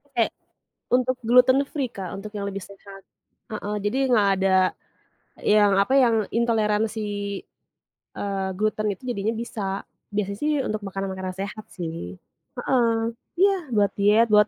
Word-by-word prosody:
Kayak 230 - +2 0.6
untuk 255 +1 +3
gluten 250 +3 +6
free, 270 -5 -2
Kak, 190 -3 -6
untuk 205 +1 -7
yang 200 -1 -3
lebih 195 -1 -5
sehat. 195 0 -13 0.5
Heeh, 210 -1 -3
jadi 210 +5 0
nggak 210 -4 +5
ada 190 0 +4 0.8
yang, 210 -1 +4
apa, 260 +7 +2
yang 245 -4 +5 0.2
intoleransi, 220 -1 +1 1.2
eee, 195 -1 -2
gluten 215 0 0
itu 190 - -17
jadinya 220 0 -1
bisa, 200 -4 -4 0.3
biasanya 200 -1 -1
sih 300 +1 +1
untuk 215 0 -2
makanan-makanan 190 -1 -4
sehat 200 +2 -5
sih. 160 - -6 0.4
Heeh, 230 -3 +1 0.3
iya 395 0 +5 0.2
buat 205 -2 +3
diet 210 +3 +5
buat 210 0 +6
210 Hz, 135 wpm, -24 LUFS, 195-230 Hz, 1.2 s, gluten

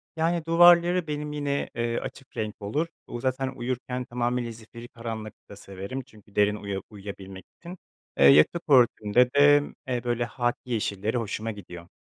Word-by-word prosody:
Yani, 165 0 0
duvarları 175 +1 +5
benim 150 0 -4
yine, 145 -1 -2
eee, 115 0 -1
açık 135 - -10
renk 105 -1 -4
olur. 145 +12 -1 0.2
U 120 - -6
zaten 130 0 -1
uyurken 125 0 -4
tamamıyla 120 0 -2
zifiri 115 +1 -12
karanlıkta 110 -3 -8
severim 100 +6 -7
çünkü 105 -4 -20
derin 105 0 +3
uya 100 -2 -5
uyuyabilmek 95 -2 -9
için. 175 +2 -9 0.4
Eee, - - +5
yatak 75 - +6
örtümde 125 -2 +4
de, 145 +1 +6 0.2
eee, 125 -2 -2
böyle, 120 0 0
hâkî 120 +1 -3
yeşilleri 105 +1 -1
hoşuma 110 0 -3
gidiyor. 90 -4 -10
120 Hz, 150 wpm, -26 LUFS, 105-140 Hz, 0.4 s, yatak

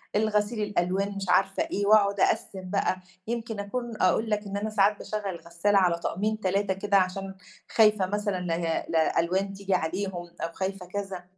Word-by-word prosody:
الغسيل 210 +1 +1
الألوان 195 0 0
مش 195 0 -4
عارفة 195 +2 +3
إيه، 205 - -2
وأقعد 200 -1 +4
أقسِّم 185 -1 0
بقى، 195 -1 +1 0.3
يمكن 230 -2 -3
أكون 230 +3 -4
أقول 220 +4 +3
لك 210 -1 0
إن 200 0 -3
أنا 210 +2 -2
ساعات 210 -1 +3
باشغّل 210 -1 -4
الغسالة 170 +5 +1
على 180 -3 +3
طقمين 210 +5 -1
3 195 0 +1
كده 200 +1 +2
عشان 190 +1 -1 0.4
خايفة 210 -3 +5
مثلًا 205 0 -1
ل 165 -2 -2
لألوان 170 +4 +1
تيجي 195 -1 -2
عليهم 185 +4 -1 0.3
أو 165 - -2
خايفة 190 -1 -3
كذا. 190 -1 -5
195 Hz, 165 wpm, -27 LUFS, 185-210 Hz, 0.4 s, خايفة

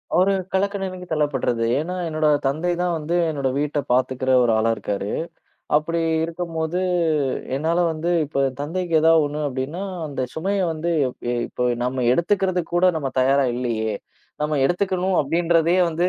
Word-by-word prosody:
ஒரு 190 +2 +4 0.2
கலக்க 200 +2 +1
நிலைக்கு 185 -1 -5
தள்ளப்பட்றது. 135 -6 0
ஏன்னா, 170 +5 -2
என்னோட 155 -1 0 0.2
தந்தை 155 +6 0
தான் 175 -1 0
வந்து 160 +3 -2
என்னோட 140 -3 -1
வீட்ட 150 0 0
பாத்துக்கிற 130 +1 +1
ஒரு 120 - +3
ஆளா 110 +1 +2
இருக்காரு. 100 -1 -3 0.7
அப்டி 165 +2 0 0.2
இருக்கும்போது 165 0 -3 0.8
என்னால 160 +5 0
வந்து 160 +2 -2 0.2
இப்ப 140 -2 0 0.2
தந்தைக்கு 170 +3 -3
ஏதாவது 160 -1 +5
ஒண்ணு 150 +1 -4
அப்டின்னா, 135 +8 -4 0.2
அந்த 135 -3 -3
சுமைய 195 +5 -1
வந்து 160 +2 -3 0.6
இப்ப 125 0 -1 0.2
நாம 125 0 -1
எடுத்துக்கறதுக்கு 180 0 0
கூட 185 +1 +5
நாம 135 -3 -3
தயாரா 135 +1 +3
இல்லையே, 115 -3 -1 0.5
நாம 150 -1 0
எடுத்துக்கணும் 185 +1 0
அப்டின்றதே 165 +3 +2
வந்து 175 +3 +1
160 Hz, 140 wpm, -22 LUFS, 135-175 Hz, 0.8 s, ஏதாவது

